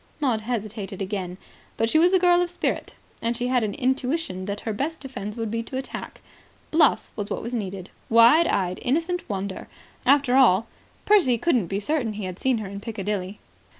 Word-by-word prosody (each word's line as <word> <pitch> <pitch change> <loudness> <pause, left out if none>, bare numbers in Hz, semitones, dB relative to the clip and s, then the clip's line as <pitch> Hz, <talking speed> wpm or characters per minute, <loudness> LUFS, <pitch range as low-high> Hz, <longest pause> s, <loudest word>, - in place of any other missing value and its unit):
Maud 250 -7 +1
hesitated 215 -4 -4
again. 190 -2 -4 0.4
But 225 - +2
she 315 +7 +3
was 350 +2 +5
a 380 - +5
girl 355 -1 +4
of 355 - 0
spirit. 355 - -2 0.3
And 230 +1 0
she 245 +1 -1
had 250 -1 +3
an 205 -2 -2
intuition 260 - -1
that 205 +1 -4
her 220 - -3
best 305 +9 -3
defence 230 -6 -6
would 225 -2 -3
be 230 - -1
attack. 260 +3 -6 0.5
Bluff 310 -2 +3
was 205 -2 -4
what - - -3
was 235 +2 -5
needed. 195 -5 -4 0.2
Wide 235 +9 +6
eyed, 185 -2 0
innocent 335 +7 0
wonder... 195 -1 -4 0.4
After 275 -1 +4
all, 225 -5 +5 0.4
Percy 355 - +4
couldn't 240 - +1
be 195 +3 -2
certain 240 -1 -1
he 210 -1 -5
had 185 0 -6
seen 260 -2 +2
her 215 -2 -5
in 200 +1 -7
Piccadilly. 205 -2 -4
230 Hz, 185 wpm, -24 LUFS, 200-270 Hz, 0.5 s, Wide